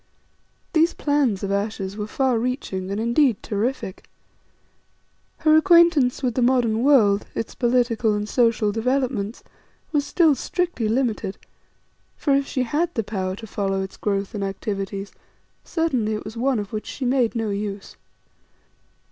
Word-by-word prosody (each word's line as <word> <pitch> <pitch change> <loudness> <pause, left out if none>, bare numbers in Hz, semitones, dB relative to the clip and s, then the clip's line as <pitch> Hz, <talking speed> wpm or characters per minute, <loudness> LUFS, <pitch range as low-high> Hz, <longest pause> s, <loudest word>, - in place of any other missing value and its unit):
These 330 +1 +3
plans 280 -10 +1
of 195 - -2
Ayesha's 200 -1 -2
were 210 0 -4
far 255 0 +1
reaching 225 -7 -3
and 200 +2 -2
indeed 235 0 +2
terrific. 215 -1 -3 1.4
Her 310 0 +6
acquaintance 330 -6 +5
with 250 -2 +1
the 255 - 0
modern 240 -3 +2
world, 220 -7 +4
its 225 - -3
political 240 -3 +1
and 210 0 -3
social 230 -3 +2
developments, 240 -1 -1 0.5
was 295 -2 +1
still 315 +1 +3
strictly 340 - -2
limited; 225 -4 -1 0.8
for 285 - +1
if 275 0 +2
she 255 - -1
had 310 +8 0
the 225 - 0
power 190 -3 -3
to 220 - -9
follow 195 -2 -2
its 190 - -8
growth 200 -1 -2
and 205 -2 -3
activities, 195 0 -4 0.5
certainly 255 -11 0
it 215 - -6
was 220 - -7
one 255 +2 +1
of 205 -1 -5
which 215 - -4
she 265 - -5
made 250 -2 +1
no 225 -2 -1
use. 200 -1 -5
230 Hz, 150 wpm, -23 LUFS, 205-265 Hz, 1.4 s, Her